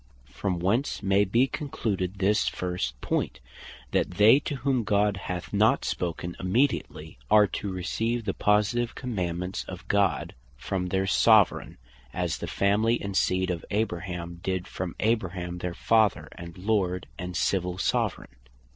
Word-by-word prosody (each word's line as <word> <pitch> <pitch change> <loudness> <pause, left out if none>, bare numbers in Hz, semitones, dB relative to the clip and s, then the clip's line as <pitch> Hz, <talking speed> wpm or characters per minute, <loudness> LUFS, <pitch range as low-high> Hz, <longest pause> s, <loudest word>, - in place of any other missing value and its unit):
From 95 -3 -2
whence 105 +9 0
may 100 +1 +3
be 115 +7 +3
concluded 105 - -3
this 100 +2 +2
first 90 -10 -3
point, - - -1 0.5
that - - +1
they 110 +7 +7
to 145 - -4
whom 130 -2 0
God 105 -1 +2
hath 90 -1 -5
not - - +3
spoken 85 0 -3
immediately, 90 - -1
are 105 -1 +7
to 100 0 -4
receive 115 +6 -2
the 95 - -1
positive 105 +3 +1
commandements 90 -6 -3
of - - -9
God, 100 -4 +1 0.2
from 90 +6 -3
their 95 +1 0
Soveraign; 105 0 +4 0.4
as 90 -2 -1
the - - -4
family 110 +4 +2
and 100 -1 -5
seed 95 -1 +2
of 85 -2 -4
Abraham 90 -4 -3
did 95 -1 -2
from 90 -2 -5
Abraham 95 -5 -1
their 90 -1 -4
Father, 110 -3 +2
and 85 0 -10
Lord, 95 -2 0
and 90 -2 -4
Civill 90 -2 0
Soveraign. - - -1
95 Hz, 145 wpm, -27 LUFS, 90-110 Hz, 0.5 s, they